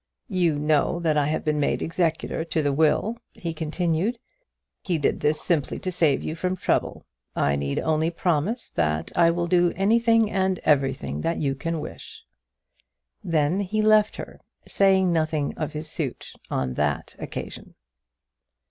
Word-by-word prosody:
"You 175 -6 +1
know 150 +3 +1
that 160 -2 +1
I 145 -1 +2
have 155 - -1
been 150 -1 +1
made 145 - 0
executor 165 -1 -1
to 160 -1 -1
the 145 -1 +1
will," 160 +10 +2
he 170 -2 -5
continued. 165 +7 -1 0.7
"He 175 -4 0
did 150 - 0
this 150 +1 +1
simply 150 -7 0
to 185 -2 -4
save 160 -6 +2
you - - -3
from 180 +3 -2
trouble. 185 - -1 0.3
I 70 0 +2
need 70 0 -2
only 160 +1 +1
promise 175 - -1
that 80 0 -1
I 170 -1 +5
will 170 +1 0
do 175 0 +3
anything 225 +2 +3
and 190 -1 +1
everything 135 - +1
that 165 - -1
you 140 -2 0
can 165 +4 -3
wish." - - -9 1.0
Then 160 +2 +1
he 215 +2 0
left 215 0 +4
her, - - -8 0.3
saying 190 -2 +3
nothing 155 -3 0
of 155 - -4
his 155 +1 -5
suit 150 -4 -4 0.2
on 65 -1 -1
that 75 +1 -2
occasion. - - -7
160 Hz, 155 wpm, -25 LUFS, 150-185 Hz, 1.0 s, I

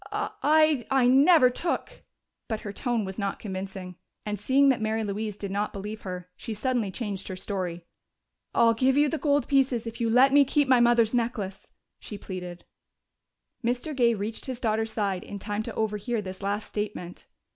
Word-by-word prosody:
Uh - - -2
I 290 -4 +3
never 270 +1 +6
took 335 +7 -3 0.2
" - - -56
But 220 -2 -2
her 205 - -6
tone 235 -2 -1
was 190 +2 -6
not 200 -1 -2
convincing, 190 -2 -6 0.3
and 210 -1 -3
seeing 270 +6 +4
that 260 -4 +2
Mary 220 +1 0
Louise 210 0 -3
did 200 -2 -5
not 205 +2 -1
believe 210 +2 -6
her, 180 -2 -6
she 225 - -6
suddenly 240 -2 0
changed 200 -2 -5
her 185 - -5
story. 185 -3 -4 0.7
"I'll 230 -1 +5
give 260 +4 +2
you 295 0 +4
the 320 - -2
gold 290 -1 +1
pieces 265 -4 +2
if 230 +1 -6
you 230 - +1
let 260 +4 +5
me 285 0 +7
keep 285 +1 +1
my 255 -2 +5
mother's 235 -1 +4
necklace," 220 -5 -2 0.3
she 210 - -8
pleaded. 180 -3 -7 1.0
Mr. 245 +6 -1
Gay 235 -3 +3
reached 215 +6 -5
his 255 -2 -4
daughter's 220 -1 0
side 200 -4 -1
in 205 - -7
time 205 +1 -3
to - - -6
overhear 220 +2 -1
this 190 -2 -7
last 205 +2 -2
statement. 205 -4 -5
220 Hz, 185 wpm, -27 LUFS, 200-255 Hz, 1.0 s, me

